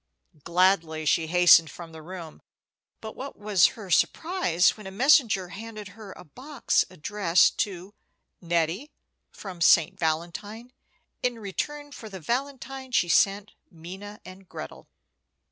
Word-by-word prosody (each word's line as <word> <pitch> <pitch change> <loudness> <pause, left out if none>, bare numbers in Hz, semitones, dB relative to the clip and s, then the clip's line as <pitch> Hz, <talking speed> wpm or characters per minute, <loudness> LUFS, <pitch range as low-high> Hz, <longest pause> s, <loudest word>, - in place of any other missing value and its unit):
Gladly 170 -3 +1
she 160 +2 +2
hastened 175 -1 +6
from 170 -2 -11
the 160 0 -11
room; 170 -1 -10 0.6
but 220 -1 -8
what 275 +2 -8
was 205 -3 +2
her 200 -5 -9
surprise 180 - +2
when 215 -3 -11
a - - -5
messenger 220 - +3
handed 215 +1 -9
her 200 0 -12
a - - -13
box 260 - -1
addressed 185 0 +1
to 190 0 -3 0.5
"Nettie, 170 - -1 0.4
from 185 -4 -10
St. 165 0 +4
Valentine, 175 +9 -4 0.5
in 245 -1 -1
return 290 +8 -5
for 225 -5 -10
the 190 -2 -9
valentine 265 - -4
she 175 -7 +1
sent 200 +3 +2 0.2
Minna 190 +5 -10
and 185 0 -13
Gretel." - - -9
195 Hz, 130 wpm, -26 LUFS, 170-225 Hz, 0.6 s, hastened